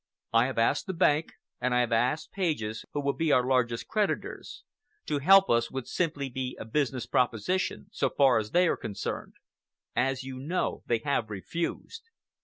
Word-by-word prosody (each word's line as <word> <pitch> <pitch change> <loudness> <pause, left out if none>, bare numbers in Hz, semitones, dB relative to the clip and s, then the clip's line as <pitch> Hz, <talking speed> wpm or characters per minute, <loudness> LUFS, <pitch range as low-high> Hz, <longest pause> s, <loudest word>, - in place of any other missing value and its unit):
I 115 +2 +5
have 130 - -5
asked 115 +9 +2
the 190 - -3
bank 160 -2 +2 0.3
and 125 0 0
I 125 - +4
have 120 -1 -1
asked 125 +7 +1
Pages, 150 - -2
who 145 - -2
will 140 0 0
be 160 -2 0
our 125 -2 +4
largest 125 -3 +1
creditors. 210 -2 -2 0.4
To 145 - -1
help 195 +6 +7
us 115 0 +2
would 130 -2 -5
simply 155 -6 -1
be 130 0 -4
a - - -6
business 130 +1 -1
proposition, 130 - 0
so - - 0
far 135 -5 +4
as 110 -1 -4
they 180 +6 +4
are - - +2
concerned. 100 - -5 0.6
As 130 +1 0
you 130 -1 -7
know, 165 +7 -2
they 115 -2 +1
have 130 -6 0
refused. 170 - -5
135 Hz, 180 wpm, -28 LUFS, 120-160 Hz, 0.6 s, help